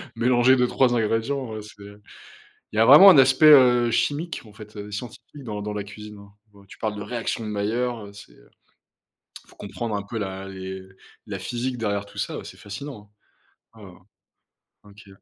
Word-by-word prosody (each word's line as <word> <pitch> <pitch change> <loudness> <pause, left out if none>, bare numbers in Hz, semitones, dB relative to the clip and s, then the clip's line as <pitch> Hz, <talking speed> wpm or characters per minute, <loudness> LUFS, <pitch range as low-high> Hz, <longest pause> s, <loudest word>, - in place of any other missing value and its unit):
mélanger 125 +1 +3
2-3 125 0 +2
ingrédients, 115 +1 -2
c'est 105 -1 -14 0.9
il - - -7
y - - -1
a 115 - +6
vraiment 165 +10 +10
un 160 - +6
aspect, 135 +3 +5
heu, 125 -4 +5
chimique 150 +6 -2
en 105 - -15
fait, 105 +1 -14
heu, 105 0 -8
scientifique 120 +5 -9
dans 105 -3 -5
dans 105 - -5
la 105 -1 -4
cuisine. 105 +1 -11 0.5
Tu - - -15
parles 110 -2 -3
de 105 - -6
réaction 115 +1 -4
de 110 - -5
Mailleur, 110 +2 -3
c'est 100 -11 -14
il - - -25 0.9
faut - - -20
comprendre 115 -3 -5
un 100 - -3
peu 115 +3 -7
la 95 -1 -5
les 95 0 -8 0.5
la - - -6
physique 125 +1 -4
derrière 100 -3 -2
tout 100 - -17
ça, - - -4
c'est - - -12
fascinant! 105 0 -10 0.7
Oh 95 -4 -14 0.8
OK. 105 0 -17
110 Hz, 170 wpm, -23 LUFS, 105-125 Hz, 0.9 s, vraiment